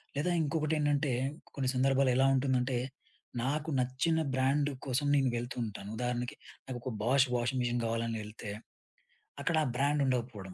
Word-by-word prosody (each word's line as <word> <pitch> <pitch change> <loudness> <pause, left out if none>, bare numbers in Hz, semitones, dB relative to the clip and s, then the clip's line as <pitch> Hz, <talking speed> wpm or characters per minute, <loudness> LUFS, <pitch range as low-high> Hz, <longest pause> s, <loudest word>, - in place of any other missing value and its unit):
లేదా 155 +5 +1
ఇంకొకటేండంటే 150 -2 +1 0.4
కొన్ని 130 -2 0
సందర్భాల్లో 135 0 +3
ఎలా 135 - +5
ఉంటుందంటే 130 -1 +1 0.7
నాకు 150 +4 -1
నచ్చిన 135 +6 +1
బ్రాండ్ 140 +3 +2 0.2
కోసం 135 +2 0
నేను 135 -2 +3
వెళ్తూ 120 +1 -4
ఉంటాను. 100 -1 -7
ఉదాహరణకి 125 0 -2 0.3
నాకొక 125 0 -4
'బాష్' 130 +3 +4
వాషింగ్ 125 +2 0
మిషన్ 120 0 0
గావాలని 115 0 -1
ఎళ్తే 105 -1 -7 0.9
అక్కడ 165 - +1
ఆ - - 0
బ్రాండ్ 145 +2 +2
ఉండకపోవడం. 115 -7 -2
130 Hz, 135 wpm, -32 LUFS, 120-140 Hz, 0.9 s, ఎలా